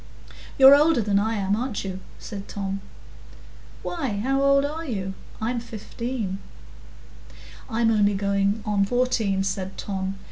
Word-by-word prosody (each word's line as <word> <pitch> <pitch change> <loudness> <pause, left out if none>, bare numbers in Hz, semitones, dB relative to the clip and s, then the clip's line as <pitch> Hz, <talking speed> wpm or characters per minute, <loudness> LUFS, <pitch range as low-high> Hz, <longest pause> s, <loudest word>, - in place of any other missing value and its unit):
"You're 270 0 +10
older 300 -1 +4
than 200 -1 +2
I 220 +2 0
am, 200 -1 +1
aren't 235 -1 -3
you?" 190 -1 -4 0.2
said 200 -2 -8
Tom. 195 -1 -4 1.0
"Why, 270 -12 -2
how 270 +3 +1
old 275 0 +4
are 310 +3 -4
you? 195 - -3 0.3
I'm 235 +2 -1
fifteen." 230 -2 -5 1.3
"I'm 225 -1 +2
only 205 -2 +3
going 200 +1 +1
in 205 -2 +2
fourteen," 225 -4 +1
said 190 0 -3
Tom. 190 -1 -3
210 Hz, 135 wpm, -25 LUFS, 195-250 Hz, 1.3 s, You're